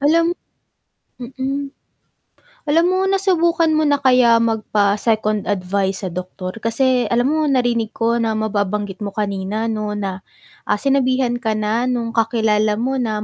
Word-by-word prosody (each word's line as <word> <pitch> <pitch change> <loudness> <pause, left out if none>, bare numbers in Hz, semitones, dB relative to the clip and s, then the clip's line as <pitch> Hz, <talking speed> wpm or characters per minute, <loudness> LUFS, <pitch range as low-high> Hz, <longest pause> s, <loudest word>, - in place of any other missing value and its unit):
Alam 330 +4 +3 0.9
mm. 270 +3 -4 0.9
Alam 325 +3 +3
mo 370 - +1
nasubukan 345 -4 +2
mo 310 -1 +2
na 285 - +4
kaya 250 -4 +4
magpa-second 215 -1 0
advice 195 0 -1
sa 185 - -3
doktor? 185 +1 -6
Kasi 250 +2 +1
alam 245 +5 +1
mo 310 -1 +1
narinig 240 -4 0
ko 230 +1 +1
na 225 -1 0
mababanggit 205 -2 -2
mo 200 -2 -5
kanina, 210 +2 -2
'no, 215 -1 -3
na, 195 -2 -4 0.5
ah, 210 - +2
sinabihan 255 0 +1
ka 220 -3 -1
na 215 +3 0
no'ng 240 -2 -1
kakilala 220 -2 +1
mo 260 +4 -1
na 215 -3 -2
230 Hz, 140 wpm, -19 LUFS, 210-265 Hz, 0.9 s, na